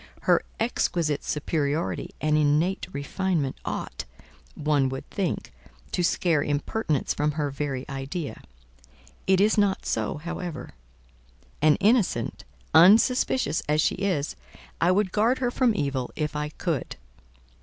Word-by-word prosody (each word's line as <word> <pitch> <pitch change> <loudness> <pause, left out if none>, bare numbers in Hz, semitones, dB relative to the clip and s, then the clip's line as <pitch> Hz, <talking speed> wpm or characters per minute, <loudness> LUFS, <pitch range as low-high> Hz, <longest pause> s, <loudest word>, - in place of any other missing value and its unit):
Her - - +4 0.2
exquisite 170 -10 0
superiority 150 +1 -1
and 155 0 +1
innate 155 +5 +2
refinement 150 -1 -1
ought, - - -4 0.5
one 145 -3 +1
would 135 0 -6
think, 195 -3 -2 0.4
to 180 - 0
scare 170 -3 +2
impertinence 145 +2 -1
from 150 +1 0
her 145 -2 -1
very 135 -2 -3
idea. 140 +3 -5 0.9
It 190 -1 +4
is 210 +2 +4
not 200 -2 +1
so, - - -1
however; 170 +1 -6 0.9
and 155 0 +5
innocent, 205 - +1 0.3
unsuspicious 220 - +5
as 150 0 +3
she - - +3
is, 180 -7 -1 0.5
I 170 - +4
would 190 0 +2
guard 225 +6 +2
her 245 -2 0
from 245 -3 +2
evil 135 -7 -1
if 150 0 -2
I 150 0 -2
could. 160 -1 -3
155 Hz, 125 wpm, -26 LUFS, 145-190 Hz, 0.9 s, and